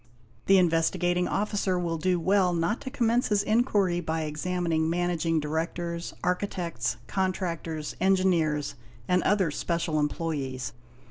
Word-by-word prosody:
The 195 - +7
Investigating 175 +1 +2
Officer 200 -2 0
will 170 -2 -2
do 180 +2 +1
well 185 +1 +3
not 170 +7 0
to 270 - -5
commence 240 -1 +1
his 205 -1 +2
inquiry 210 -6 +2
by 160 -1 -2
examining 160 +1 -1
managing 170 -1 0
directors, 170 +3 -3
architects, 180 - -1
contractors, 170 -3 -2
engineers, 180 -6 +2 0.3
and 180 0 +3
other 190 -6 +2
special 165 0 -1
employés. 140 -5 -3
175 Hz, 120 wpm, -27 LUFS, 160-185 Hz, 0.3 s, The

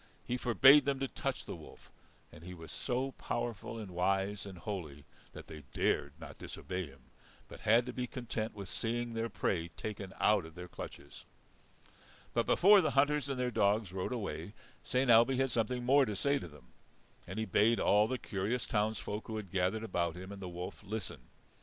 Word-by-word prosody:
He 125 - -1
forbade 135 +4 +7
them 140 -1 +1
to 135 - -1
touch - - -3
the - - -5
wolf. - - -14 0.4
And 75 - -13
he 90 +1 -8
was 80 -2 -10
so 130 +1 -1
powerful 120 -3 -4
and 105 -4 -7
wise 95 +3 0
and 95 -2 -9
holy 85 -7 -6 0.3
that - - -9
they 80 -1 -9
dared - - +1
not - - -10
disobey 90 -2 -5
him, 70 -1 -16 0.5
but - - -11
had 115 +3 +4
to 125 - -5
be 125 0 -3
content 115 -3 -4
with 100 -2 -7
seeing 120 +4 -2
their 115 0 -1
prey 85 -6 -1
taken 95 +3 -6
out 105 -3 +4
of 80 0 -11
their 90 0 -7
clutches. - - -9 1.1
But - - +1
before 200 +2 +7
the 155 - +1
hunters 145 +1 +3
and 135 -2 -2
their 125 -1 0
dogs 100 -3 +2
rode 95 +4 -2
away, 100 -5 -4 0.3
Saint 130 -1 +2
Ailbe 120 +3 +6
had 135 -1 +1
something 120 +2 0
more 135 +2 +6
to 105 - -3
say 140 +7 +1
to - - -7
them. 75 -2 -16 0.6
And - - -6
he 110 - 0
bade 115 +2 +3
all 105 +1 +4
the 130 - -1
curious 105 +3 -2
towns 110 0 0
folk 105 +2 -5
who 110 - -4
had 100 -5 -7
gathered 95 +4 0
about 85 -6 -1
him 95 +2 -8
and 100 -1 -8
the 90 - -5
wolf 90 +1 -6
listen. 105 - -5
110 Hz, 195 wpm, -33 LUFS, 95-125 Hz, 1.1 s, forbade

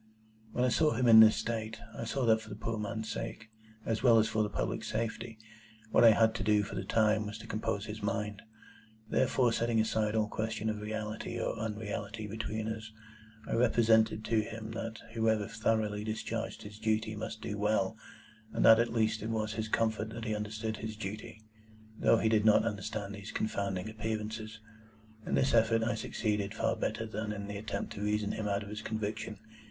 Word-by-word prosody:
When 125 - 0
I - - +3
saw 155 +4 +3
him 125 - +1
in 110 -1 +10
this 110 -1 +9
state, 110 0 -3 0.2
I - - -4
saw 125 +3 -1
that 110 -1 +4
for 110 - -12
the 100 - -6
poor 110 +1 -3
man's 110 +1 -3
sake, 110 0 -5 0.3
as 110 -1 -1
well 120 -3 +6
as 110 - +4
for 110 - 0
the 105 - 0
public - - -2
safety, 115 0 -3 0.5
what - - +5
I 115 - +10
had 110 +1 +4
to 110 - -3
do 105 0 +3
for 100 - -7
the - - -3
time 110 -1 +2
was 105 +1 -6
to - - -10
compose 100 -1 -2
his 110 0 -6
mind. 105 0 -2 0.7
Therefore, 125 0 +2
setting 115 -1 +1
aside 110 -1 +1
all 110 -1 +2
question 110 0 -2
of 105 -1 -5
reality 110 0 -4
or - - -1
unreality 105 0 -4
between 110 +1 -3
us, 110 0 -5 0.6
I - - -2
represented 110 -2 +3
to 110 -1 +2
him 110 0 -6
that 115 0 -5 0.2
whoever 110 -2 +1
thoroughly 110 -2 0
discharged 110 0 -4
his 105 +1 -10
duty 110 0 0
must 110 +1 -5
do 105 -1 -4
well, 105 -1 +1 0.6
and - - +2
that 115 0 +9
at 120 - +2
least 110 -1 +1
it 110 - -3
was 110 -1 -1
his 110 0 -3
comfort 110 -1 0
that 115 0 -6
he 110 -1 -1
understood 110 +1 -3
his 110 0 -5
duty, 110 +1 -7 0.6
though 115 - +5
he 110 - +1
did 110 -1 +3
not 110 0 +5
understand 105 -1 -3
these 100 0 -8
confounding 100 -2 -2
Appearances. 110 0 -4 0.7
In - - +1
this 130 - +2
effort 115 0 +4
I 115 - +1
succeeded 105 -2 -2
far 115 +1 +1
better 110 +1 -2
than 110 0 -4
in 100 -1 -5
the 100 0 -5
attempt 110 +2 -4
to 100 - -7
reason 105 0 0
him 110 -1 -3
out 100 0 0
of 100 - -9
his 105 0 -5
conviction. 110 -1 -3
110 Hz, 200 wpm, -32 LUFS, 105-110 Hz, 0.7 s, in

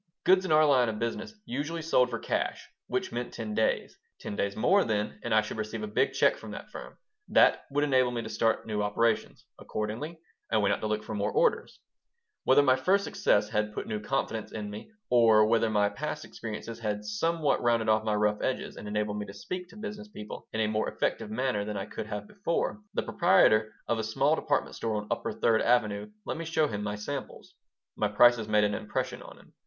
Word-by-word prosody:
Goods 185 0 +4
in 180 - -2
our 155 0 +6
line 130 -5 +4
of 110 - -3
business 115 - -4
usually 150 +6 -3
sold 125 -6 +3
"for 120 - -3
cash," - - -2 0.2
which - - -2
meant 120 +1 -4
ten 110 -2 -4
days. 110 - 0 0.2
Ten 100 - -6
days 100 0 -1
more, 190 - +4
then, 105 -1 -2
and 120 - -4
I 110 0 +5
should 110 - -6
receive 110 - -4
a - - -3
big 210 - +1
check - - +3
from - - -10
that - - -9
firm. - - -9 0.3
That - - +4
would 145 +1 +1
enable 130 -3 +3
me 120 -1 -3
to - - -6
start 115 -1 0
new 105 -2 -2
operations. 110 +2 0
Accordingly, 115 +11 -4 0.3
I 110 - +3
went 100 -1 +3
out - - -3
to 110 - -1
look 105 0 -1
for 110 - -6
more 100 -1 -1
orders 485 0 +1 0.7
Whether 140 +2 +6
my 130 -2 +4
first 190 +9 +2
success 105 - +1
had 105 0 -1
put - - -3
new 110 -1 -3
confidence 115 -2 -2
in 105 -2 -5
me, 105 - -8 0.2
or 115 -3 +6
whether 115 0 +2
my 105 -1 +3
past 130 +10 -4
experiences 115 +1 -7
had 105 -2 -3
somewhat 150 +9 0
rounded 115 -2 +2
off 110 0 +3
my 110 -1 0
rough 105 0 +1
edges 130 - -2
and - - -8
enabled 105 0 -1
me 105 - -5
to 100 - -10
speak 180 - -6
to - - -14
business 210 0 -7
people 105 - -9
in 110 - -1
a 110 - +2
more 110 0 0
effective - - -2
manner 115 -2 -1
than 105 0 -4
I 95 - -3
could 105 - -6
have 105 -1 -4
done - - -19
before, 195 +2 -1 0.2
the - - 0
proprietor 140 - +4 0.2
of 115 - 0
a - - -1
small 110 +1 +2
department - - -1
store 110 -1 -2
on 105 0 -3
upper - - -1
Third 115 -1 +2
Avenue 105 -4 +1 0.2
let - - -3
me 165 - -5
show 160 -1 +2
him 105 -6 -4
my 105 0 -3
samples. 130 +6 -6 0.4
My 105 - +1
prices 115 +2 +5
made 105 -1 +3
an 105 0 +1
impression 105 0 -3
on - - -12
him. - - -20
110 Hz, 225 wpm, -29 LUFS, 105-135 Hz, 0.7 s, our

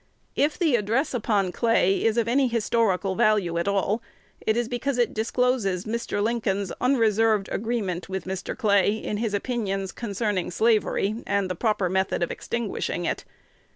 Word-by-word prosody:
If 295 +2 +1
the 325 -8 +3
address 230 +8 0
upon 210 -6 +1
Clay 210 -3 +2
is 225 0 +2
of 230 -1 +2
any 260 +3 +3
historical 220 -4 +1
value 190 -4 +2
at 170 - -2
all, 200 +3 +1 0.4
it 220 +1 0
is 240 -1 0
because 250 +2 -2
it 240 -1 +1
discloses 220 -4 0
Mr. 220 -2 -2
Lincoln's 205 -4 -1
unreserved 225 -5 +3
agreement 200 -6 -2
with 190 -2 -4
Mr. 190 0 -4
Clay 205 -2 +3
in 210 -1 -4
his 215 -2 -1
opinions 195 -4 -2
concerning 205 -4 -2
slavery 215 +1 +1
and 200 -2 0
the - - -2
proper 210 -1 +1
method 190 0 0
of 170 - -2
extinguishing 220 -6 -3
it. - - -2
215 Hz, 155 wpm, -25 LUFS, 195-235 Hz, 0.4 s, the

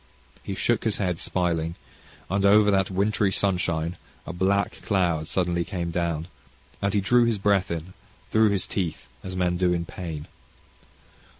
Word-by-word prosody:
He 95 - -5
shook 120 +4 +1
his 110 -3 0
head 90 -4 -1
smiling, 85 -2 -1 0.5
and 100 +2 0
over 105 +1 +6
that 95 -2 +2
wintry 100 +1 +1
sunshine 90 -4 0 0.3
a - - -5
black 100 +3 0
cloud 85 -6 0
suddenly 85 -2 0
came 85 -2 -4
down, 85 -2 -1 0.5
and 100 - +1
he 100 - +3
drew 120 +5 +4
his 115 -2 +1
breath 100 -2 +2
in, 85 +2 -5 0.4
through 110 0 +5
his 100 -2 0
teeth 90 -6 -3 0.2
as 95 0 -6
men 90 -1 +1
do 90 -1 +2
in 85 -1 -1
pain. 80 -4 -6
95 Hz, 160 wpm, -25 LUFS, 85-100 Hz, 0.5 s, over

